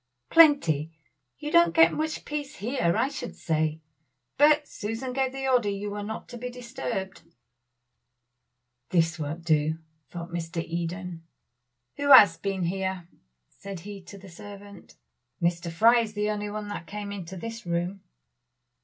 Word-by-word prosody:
"Plenty. 175 - +5 0.5
You 300 0 -5
don't 340 0 +5
get 325 0 +6
much 310 0 -3
peace 295 0 -4
here, 205 - 0
I - - +2
should 290 +1 -6
say; 155 -1 -1 0.5
but 295 0 +5
Susan 225 +5 -5
gave 265 0 0
the 270 0 -4
order 245 -5 +3
you 200 +1 -3
were 205 0 -4
not 220 +2 -6
to 240 - -8
be 250 +1 -4
disturbed." 240 -6 -5 1.7
"This 165 -1 +2
won't 155 +3 -5
do," 155 0 +2 0.3
thought 170 0 -7
Mr. 170 0 -4
Eden. 170 +1 -4 0.8
"Who 285 0 -1
has 205 -11 +10
been 195 -2 -2
here?" 190 0 -2 0.4
said 195 -3 -9
he 200 +1 -8
to 200 - -11
the 195 0 -13
servant. 200 +3 -12 0.4
"Mr. 170 -1 0
Fry 230 +8 +5
is 220 -2 -2
the 210 0 0
only 210 0 -3
one 210 0 -5
that 170 -5 -6
came 205 0 -6
into 190 -2 -7
this 225 +1 -7
room." 175 +3 -2
200 Hz, 150 wpm, -27 LUFS, 170-245 Hz, 1.7 s, has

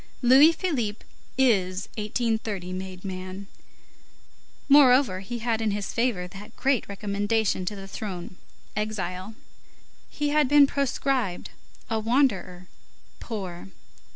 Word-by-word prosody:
Louis 270 +6 +8
Philippe 250 - -2 0.3
is 195 -7 +2
1830 215 -4 -2
made 185 0 -7
man. 185 +1 -6 1.2
Moreover, 260 -7 +6
he 220 +5 -5
had 225 -2 0
in 220 - +1
his 205 -1 -3
favor 230 -7 0
that 205 +4 -12
great 270 -4 +1
recommendation 205 0 -1
to 205 - -3
the 195 -1 -9
throne, 185 -3 -6 0.4
exile. 205 -1 -3 0.7
He 295 0 -2
had 300 -1 +3
been 290 +1 +7
proscribed, 270 -7 -1 0.4
a 225 -2 -1
wanderer, 215 -7 0 0.5
poor. 185 - -6
210 Hz, 110 wpm, -26 LUFS, 185-250 Hz, 1.2 s, Louis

